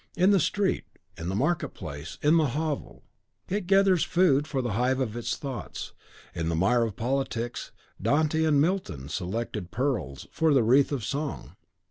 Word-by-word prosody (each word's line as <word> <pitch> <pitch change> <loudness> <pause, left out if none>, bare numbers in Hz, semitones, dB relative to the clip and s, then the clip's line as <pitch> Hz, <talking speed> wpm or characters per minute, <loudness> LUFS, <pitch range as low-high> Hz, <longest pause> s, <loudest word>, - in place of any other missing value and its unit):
In 185 +3 +5
the 200 - +5
street, 195 +4 0 0.3
in 85 +2 -5
the 95 - -2
market 155 - 0
place, 75 +1 -7
in 155 +3 +5
the 155 -2 +3
hovel, 155 -2 -3 0.4
it 200 -1 -2
gathers 195 -3 +4
food 155 -5 +3
for 135 -4 -1
the 120 - -2
hive 125 +5 +1
of 115 -4 -2
its 120 - -2
thoughts. 135 -4 -6 0.4
In 85 0 -2
the 85 - 0
mire 100 +9 +3
of 115 -4 -1
politics, 120 0 -2 0.3
Dante 155 +8 +2
and 155 -3 +3
Milton 150 - -1
selected 95 +2 -3
pearls 115 - -2
for 160 -3 +2
the 130 - +5
wreath 130 +6 +4
of 130 -6 -2
song. 140 +2 -4
135 Hz, 170 wpm, -27 LUFS, 110-160 Hz, 0.4 s, In